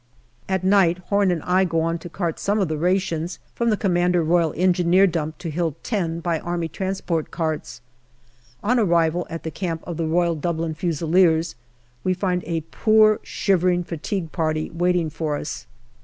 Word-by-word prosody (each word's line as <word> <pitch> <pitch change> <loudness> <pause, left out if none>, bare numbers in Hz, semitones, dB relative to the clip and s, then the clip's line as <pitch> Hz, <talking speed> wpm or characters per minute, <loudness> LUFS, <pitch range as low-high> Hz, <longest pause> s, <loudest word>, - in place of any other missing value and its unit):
At 190 -1 0
night 190 -3 +4
Home 200 -1 +3
and 175 -4 -1
I 185 +1 +3
go 165 -3 0
on 165 +1 -1
to 175 - -9
cart 170 -2 -3
some 205 +2 0
of 190 -5 +1
the 155 - -1
rations 175 -1 0 0.2
from 235 0 0
the 215 - +2
C.R.E. 175 0 +3
dump 155 -1 -3
to 170 - -5
Hill 165 -2 -1
10 170 -7 -1
by 170 -2 0
A.T. 175 +2 -2 0.4
carts. 155 -6 -3 0.8
On 245 +4 +2
arrival 170 -3 +2
at 165 -1 -6
the 160 - -4
camp 165 -1 -4
of 170 -3 -5
the 165 -1 -1
Royal 170 +1 +2
Dublin 165 0 -2
Fusiliers, 165 0 +2 0.5
we 185 0 +1
find 180 -1 -1
a 165 0 -2
poor 215 -1 +4
shivering 180 -2 +1
fatigue 170 +1 -4
party 155 -1 -1
waiting 175 -1 +1
for 150 -1 -2
us. 150 - -6
175 Hz, 160 wpm, -23 LUFS, 165-185 Hz, 0.8 s, night